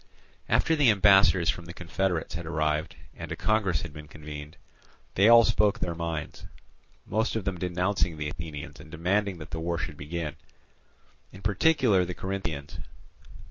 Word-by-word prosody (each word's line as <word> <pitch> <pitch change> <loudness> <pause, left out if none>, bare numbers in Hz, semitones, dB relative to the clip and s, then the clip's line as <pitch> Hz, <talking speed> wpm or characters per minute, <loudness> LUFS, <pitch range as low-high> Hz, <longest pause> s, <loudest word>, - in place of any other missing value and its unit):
After 160 - +3
the 145 -5 +4
ambassadors 95 -4 +5
from 85 -1 -9
the 85 +1 -9
confederates 85 0 -2
had 85 0 -5
arrived 75 -1 -1 0.2
and - - -8
a - - -2
congress 100 -8 +1
had 85 -3 -8
been 75 -1 -10
convened, 75 0 -9 0.6
they 100 +4 +5
all 115 0 +9
spoke 105 -3 +2
their 85 - -2
minds, 80 -2 -5 0.6
most 110 +3 0
of 110 - -2
them 95 -2 -2
denouncing 90 -1 0
the 75 -1 -3
Athenians 80 -1 -8
and 85 - -12
demanding 95 +4 0
that 75 - -10
the 80 - -3
war 85 +1 -2
should - - -5
begin. 75 0 -5 0.9
In 95 +1 -13
particular 105 - +3
the 90 0 -5
Corinthians. 85 -7 -5
85 Hz, 160 wpm, -27 LUFS, 80-100 Hz, 0.9 s, all